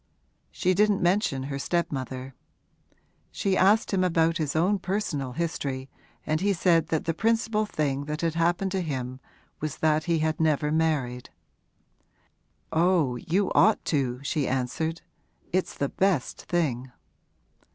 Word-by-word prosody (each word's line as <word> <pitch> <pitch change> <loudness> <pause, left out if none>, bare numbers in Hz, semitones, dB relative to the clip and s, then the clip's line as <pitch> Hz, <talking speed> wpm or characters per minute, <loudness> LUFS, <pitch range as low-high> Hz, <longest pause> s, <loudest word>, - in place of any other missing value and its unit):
She 185 - +1
didn't 205 0 +2
mention 175 -7 +1
her 140 0 -4
stepmother. 135 -4 -3 1.0
She 195 -2 0
asked 200 +4 +4
him 185 -1 +2
about 165 -2 +2
his 155 -3 -2
own 190 +5 +2
personal 180 -9 -2
history 135 -5 -3 0.3
and 155 +1 0
he 200 +1 +2
said 165 -3 +3
that 160 -2 -1
the 165 - 0
principal 225 +2 +1
thing 145 -5 -1
that 150 +1 -4
had 165 -2 0
happened 175 +3 +1
to 190 -1 0
him 130 -5 -4 0.4
was 155 -2 -4
that 155 0 +2
he 170 -1 +2
had 155 0 0
never 150 -2 +2
married. 145 -6 0 1.4
'Oh, 165 -6 +2
you 185 +9 0
ought 220 - +4
to,' 130 -4 -1
she 145 -1 -1
answered. 135 +6 -2 0.5
'It's 185 0 0
the 140 - -1
best 190 -9 0
thing.' 130 -8 -1
160 Hz, 140 wpm, -26 LUFS, 140-185 Hz, 1.4 s, asked